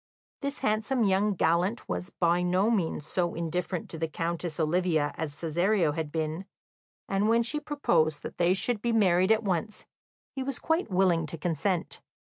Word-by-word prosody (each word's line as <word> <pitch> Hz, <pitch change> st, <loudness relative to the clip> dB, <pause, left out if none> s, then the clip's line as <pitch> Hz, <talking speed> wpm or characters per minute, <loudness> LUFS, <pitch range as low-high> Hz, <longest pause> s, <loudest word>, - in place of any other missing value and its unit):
This 280 Hz, +1 st, -3 dB
handsome 220 Hz, +4 st, 0 dB
young 200 Hz, +1 st, +2 dB
gallant 175 Hz, +7 st, +1 dB
was 180 Hz, -, -3 dB
by 175 Hz, -1 st, +1 dB
no 185 Hz, +5 st, +2 dB
means 170 Hz, -8 st, -1 dB
so 175 Hz, +1 st, -1 dB
indifferent 170 Hz, +2 st, -3 dB
to 165 Hz, -, -7 dB
the 165 Hz, -, 0 dB
Countess 165 Hz, 0 st, -3 dB
Olivia 160 Hz, -2 st, +1 dB
as 160 Hz, -2 st, -3 dB
Cesario 175 Hz, +1 st, +1 dB
had 150 Hz, 0 st, -4 dB
been, 160 Hz, +3 st, -3 dB, 0.6 s
and 200 Hz, +2 st, +1 dB
when 230 Hz, +1 st, +4 dB
she 295 Hz, +6 st, -1 dB
proposed 170 Hz, -, +1 dB
that -, -, -8 dB
they 175 Hz, +1 st, +4 dB
should 220 Hz, +2 st, 0 dB
be 235 Hz, 0 st, 0 dB
married 185 Hz, -3 st, +4 dB
at 220 Hz, 0 st, +3 dB
once, 195 Hz, +2 st, -2 dB, 0.5 s
he 265 Hz, -, -4 dB
was 265 Hz, 0 st, -2 dB
quite 325 Hz, -4 st, 0 dB
willing 180 Hz, -4 st, +2 dB
to 165 Hz, -, -7 dB
consent. 175 Hz, +3 st, -2 dB
180 Hz, 170 wpm, -28 LUFS, 165-215 Hz, 0.6 s, when